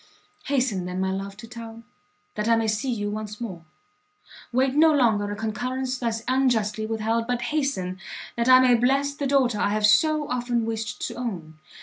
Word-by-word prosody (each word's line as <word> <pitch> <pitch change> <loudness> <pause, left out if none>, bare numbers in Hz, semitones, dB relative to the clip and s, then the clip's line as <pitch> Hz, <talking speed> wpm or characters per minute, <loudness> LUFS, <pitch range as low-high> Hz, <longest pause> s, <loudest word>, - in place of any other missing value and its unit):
Hasten 250 -10 0
then, 180 +1 -4
my 190 0 0
love, 195 +1 -5
to 230 +1 -10
town, 230 0 -9 0.5
that 210 +1 -2
I 230 - +6
may 225 -1 0
see 215 +5 -1
you 205 -3 -2
once 210 0 -6
more! 190 -8 -6 0.9
wait 260 +2 +2
no 315 +2 +5
longer 225 -8 +2
a - - -3
concurrence 250 +4 -3
thus 230 -2 -2
unjustly 225 -5 +1
with 225 -1 -3
held, 230 +1 0
but 245 -1 -1
hasten, 190 -12 -1 0.4
that 235 +1 0
I 255 0 +9
may 255 -1 +5
bless 270 +4 +2
the 285 -1 -3
daughter 260 -6 +2
I 200 - +2
have 210 0 +1
so 305 +6 +4
often 245 -2 -1
wished 225 -1 -4
to - - -7
own! 175 -11 -6
230 Hz, 190 wpm, -25 LUFS, 210-255 Hz, 0.9 s, I